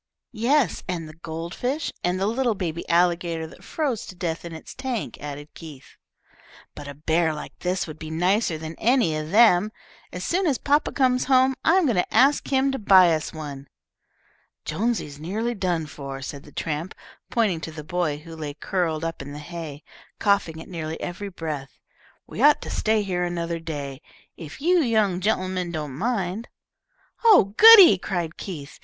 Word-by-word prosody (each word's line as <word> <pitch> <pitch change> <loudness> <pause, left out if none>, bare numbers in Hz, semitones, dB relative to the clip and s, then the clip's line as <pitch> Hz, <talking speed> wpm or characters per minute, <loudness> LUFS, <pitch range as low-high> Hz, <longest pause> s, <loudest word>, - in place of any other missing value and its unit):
"Yes, 240 - +1
and 170 -3 -3
the 155 - -11
gold 165 +1 -7
fish, 280 +5 -2
and 180 +1 0
the 195 - 0
little 235 +1 0
baby 170 -3 -4
alligator 170 -1 +1
that 160 - -14
froze 275 -9 -2
to 185 - -10
death 170 -2 -3
in 170 - -7
its 160 - -9
tank," 260 -4 -4
added 145 0 -8
Keith. 150 -5 -12 0.8
"But 145 - -9
a 145 - -8
bear 160 +2 +1
like 150 - -9
this 180 +1 -1
would 155 -1 -10
be 155 - -7
nicer 180 +2 +1
than 160 +1 -7
any 235 -10 +2
of 155 0 -4
them. 210 -1 +5 0.4
As 180 - -6
soon 365 - 0
as 275 -5 +1
papa 290 +1 +1
comes 255 -2 +2
home 260 0 +4
I 325 - +4
am 375 -3 +4
going 235 -9 +1
to 180 - 0
ask 280 +3 +4
him 270 0 +2
to 270 - -3
buy 185 -5 +6
us 155 -1 -2
one." 145 -3 -8 1.0
"Jonesy's 155 -5 -2
nearly 215 +9 -2
done 180 -6 -1
for," 140 -2 -8
said 140 +1 -6
the 145 - -14
tramp, 160 +4 -4 0.3
pointing 205 -8 +1
to 160 - -6
the 155 -1 -8
boy 175 -2 -1
who 165 +2 -11
lay 150 -3 -6
curled 165 -1 -2
up 165 -3 -4
in 140 +1 -8
the - - -7
hay, 155 -2 -8 0.3
coughing 200 -6 +1
at - - -10
nearly 160 -3 -5
every 190 +3 -5
breath. 155 -6 -6 0.5
"We - - -7
ought 295 +1 +6
to - - -6
stay 215 -1 +1
here 180 -2 -1
another 170 -1 -3
day, 145 -4 -6 0.3
if 160 - -10
you 355 +3 +4
young 215 - +1
gen'lemen 185 -3 -1
don't 150 -2 -5
object." 220 -2 -2 0.8
"Oh, 390 - +6
goody!" 405 - +10
cried 175 -4 -3
Keith. 150 -7 -8
175 Hz, 180 wpm, -24 LUFS, 155-220 Hz, 1.0 s, goody